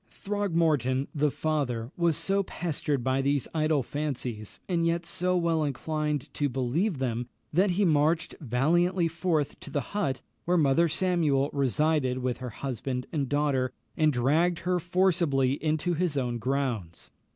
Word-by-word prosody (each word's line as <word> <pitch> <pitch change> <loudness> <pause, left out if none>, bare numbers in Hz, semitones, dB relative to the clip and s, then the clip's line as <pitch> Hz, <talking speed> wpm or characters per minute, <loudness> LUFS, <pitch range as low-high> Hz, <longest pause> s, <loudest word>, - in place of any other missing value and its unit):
Throgmorton, 165 - 0
the 150 0 +2
father, 135 -6 -2
was 170 -3 +2
so 195 +1 +1
pestered 150 -7 -2
by 130 +1 +1
these 140 0 +1
idle 155 -3 +2
fancies, 125 -7 -4
and 175 -3 +1
yet 170 0 0
so 180 +1 +1
well 165 -2 +1
inclined 150 0 -2
to 145 -1 0
believe 135 - 0
them, 120 -2 -2 0.3
that 190 +5 +4
he 205 - +3
marched 160 0 +2
valiantly 170 +8 +2
forth 165 -2 -1
to - - -10
the 145 - -1
hut 195 -11 -1 0.2
where 180 +1 +2
Mother 160 +2 +4
Samuel 155 -5 +1
resided 140 -1 +1
with 125 -1 -2
her 130 -1 -5
husband 125 +1 -4
and 140 -5 -1
daughter, 140 -3 +1 0.2
and 155 -1 +3
dragged 155 +7 +2
her 180 0 +2
forcibly 170 -7 +1
into 155 +3 +1
his 165 -3 0
own 120 -3 -1
grounds. 120 -9 -2
150 Hz, 150 wpm, -28 LUFS, 130-170 Hz, 0.3 s, that